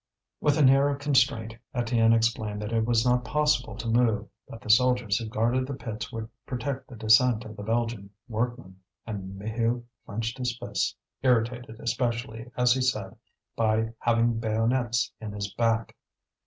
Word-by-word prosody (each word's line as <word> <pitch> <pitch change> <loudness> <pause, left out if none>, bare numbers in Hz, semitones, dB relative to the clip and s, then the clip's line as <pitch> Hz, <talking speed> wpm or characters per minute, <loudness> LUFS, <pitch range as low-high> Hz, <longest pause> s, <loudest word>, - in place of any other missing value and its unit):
With 145 -1 +2
an 145 -4 +6
air 135 +2 +5
of 140 - -1
constraint, 130 -5 +2 0.2
Étienne 115 -2 +3
explained 110 -2 0
that 105 - -4
it 115 -1 +1
was 115 0 +2
not 125 0 +3
possible 125 -2 +1
to 115 +1 -5
move, 115 -2 +2 0.2
that 115 - -9
the 110 - -11
soldiers 125 -3 +3
who 115 - -5
guarded 120 +4 +1
the 140 - -4
pits 110 -4 -6
would 110 -1 -5 0.2
protect 135 +1 -4
the 125 - -11
descent 110 +1 +4
of 110 0 -9
the 105 - -8
Belgian 115 -2 -2 0.2
workmen. 115 -4 -3 0.3
And 95 -3 -6
Maheu 115 +3 -1 0.2
clenched 115 +4 -3
his 125 -1 -2
fists, - - -2 0.3
irritated 120 -2 0
especially, 120 -1 -2
as 125 0 +5
he 130 - -1
said, 105 -7 -1 0.4
by 110 0 +1
having 115 -1 +2
bayonets 115 +2 +1
in 105 -2 -6
his 100 -1 -4
back. 115 -2 0
115 Hz, 165 wpm, -27 LUFS, 110-125 Hz, 0.4 s, an